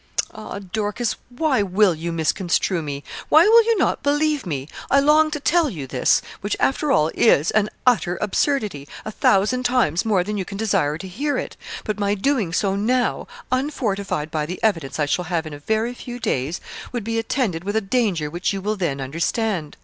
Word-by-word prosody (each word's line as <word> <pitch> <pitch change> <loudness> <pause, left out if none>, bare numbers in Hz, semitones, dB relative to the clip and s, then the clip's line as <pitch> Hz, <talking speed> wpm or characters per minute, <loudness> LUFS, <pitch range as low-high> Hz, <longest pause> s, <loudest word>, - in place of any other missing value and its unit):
'Ah, 215 - -7
Dorcas, 210 +4 -2
why 260 -1 +1
will 195 0 +3
you 165 +2 -4
misconstrue 170 +2 0
me? 145 -2 -5 0.3
Why 315 +5 +7
will 460 +1 +7
you 460 -1 +2
not 370 - +1
believe 295 -3 +1
me? 140 -4 -3 0.2
I 275 - +5
long 305 +2 +4
to 300 - -3
tell 325 +2 +2
you 155 - -6
this, 130 -1 +2 0.2
which, 205 - -2
after 285 +2 +1
all, 160 - +3
is 160 -8 +4
an 210 -1 +2 0.2
utter 210 -8 +3
absurdity, 210 - -1 0.2
a 215 - -4
thousand 210 +5 +2
times 245 -10 +2
more 205 -5 +2
than 210 +2 -3
you 195 - -1
can 195 - -8
desire 195 -9 +1
to 190 - -8
hear 280 +11 -2
it; - - -4 0.3
but 215 -1 -3
my 200 0 +1
doing 220 -4 0
so 195 +2 +1
now, 245 +5 0 0.2
unfortified 210 - -1
by 155 -2 -1
the 180 +2 -5
evidence 165 -11 0
I 150 - +3
shall 175 +5 -1
have 170 -1 -1
in 155 - -7
a 145 - -8
very 220 +9 -1
few 245 0 -8
days, 160 - -1 0.3
would 240 -3 -3
be 225 +1 -1
attended 225 - -1
with 205 +2 -3
a - - +4
danger 195 -7 0
which 175 +4 -1
you 195 - -3
will 210 +2 -2
then 160 -7 -1
understand. 165 - -2
205 Hz, 195 wpm, -22 LUFS, 170-245 Hz, 0.3 s, Why